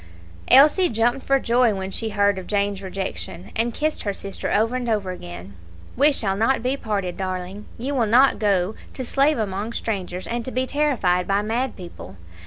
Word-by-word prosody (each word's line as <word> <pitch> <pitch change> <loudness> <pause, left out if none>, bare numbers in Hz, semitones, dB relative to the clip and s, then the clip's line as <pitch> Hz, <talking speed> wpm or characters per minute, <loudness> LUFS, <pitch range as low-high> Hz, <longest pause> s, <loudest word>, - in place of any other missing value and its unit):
Elsie 305 +7 +6
jumped 240 +3 +1
for 275 - +4
joy 235 -3 +2
when 190 0 -4
she 225 +3 -2
heard 205 -2 +2
of 185 - -10
Jane's 200 -1 0
rejection, 190 -1 -5
and 230 +2 0
kissed 305 +6 -1
her 200 - -2
sister 195 0 -4
over 225 +4 +2
and 245 -2 -2
over 205 -4 0
again. 90 - -9 0.4
"We 290 +4 +5
shall 200 -8 0
not 225 +4 +1
be 255 +2 +1
parted, 200 -8 -3
darling; 185 +1 -5
you 265 +5 -3
will 240 -5 +1
not 255 +5 +5
go 200 -2 +1 0.2
to 260 - -5
slave 280 +4 +2
among 210 +1 -3
strangers 185 -6 -4
and 235 0 -3
to 260 - -4
be 255 0 -1
terrified 245 -12 +1
by 200 +1 +1
mad 235 +4 -1
people. 170 - -10
215 Hz, 190 wpm, -23 LUFS, 190-250 Hz, 0.4 s, Elsie